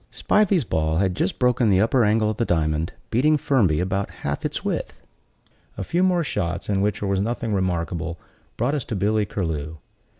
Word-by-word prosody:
Spivey's 200 -6 +2
ball 80 -5 0
had 95 0 +1
just 95 - -1
broken 125 -2 +2
the 95 -2 +4
upper 115 +4 +3
angle 110 0 +2
of 110 - -6
the - - +1
diamond; 80 -4 0 0.2
beating 150 +7 +3
Firmby 105 - +2
about 95 +2 -1
half - - -5
its - - -3
width. - - -4 0.7
A - - -3
few 175 - 0
more 180 -2 +3
shots, 85 - -3
in 100 -1 +1
which 100 0 0
there 100 - -1
was 95 -1 +1
nothing 115 0 -2
remarkable, 85 -3 -2 0.4
brought 125 +5 0
us 145 -4 -1
to 115 - -4
Billy 105 +2 +1
Curlew. 80 -6 -3
100 Hz, 190 wpm, -23 LUFS, 85-120 Hz, 0.7 s, the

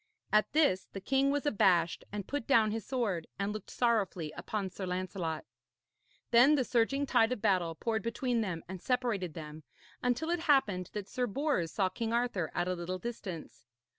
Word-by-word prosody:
At 210 -1 +4
this 290 -12 +3
the 195 - -4
king 270 +7 +2
was 285 +1 0
abashed 180 - +3
and 205 -2 -5
put 285 -4 -3
down 225 -6 +4
his 225 0 -3
sword, 215 -11 -1
and 200 0 -1
looked 215 - -7
sorrowfully 200 -10 0
upon 190 +4 -4
Sir 190 0 -5
Lancelot. 180 - -3 0.9
Then 245 +6 +7
the 270 - +2
surging 255 +5 +1
tide 225 -3 +3
of 255 - -1
battle 175 -5 +1
poured 220 +5 -1
between 235 +1 -1
them 180 -6 -3
and 185 0 -7
separated 230 - -1
them, 155 -1 -8 0.4
until 250 +7 0
it 350 - +1
happened 265 - +2
that 205 -2 -4
Sir 250 +3 -1
Bors 245 - 0
saw 195 -3 +1
King 225 +5 -3
Arthur 235 -9 0
at 175 - 0
a 185 - +1
little 180 +1 -4
distance. 185 - -7
210 Hz, 180 wpm, -32 LUFS, 185-245 Hz, 0.9 s, Then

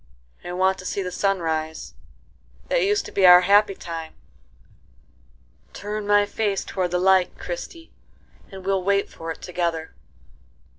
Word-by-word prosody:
"I 175 - -6
want 190 +1 +1
to 185 - -10
see 200 - -2
the 180 - -5
sun 195 0 0
rise;—that 160 - -5
used 410 +1 +1
to - - -9
be 190 -2 +4
our 180 0 +9
happy 200 +2 +4
time;—turn 65 - -11
my 205 0 +4
face 205 -2 -2
toward 185 -2 -2
the 180 - 0
light, 185 0 +3
Christie, 350 -10 -7 0.6
and 190 -1 -10
we'll 195 -1 0
wait 200 +1 +1
for 165 - -8
it 165 - -7
together." 170 -3 -3
185 Hz, 140 wpm, -23 LUFS, 160-200 Hz, 0.6 s, our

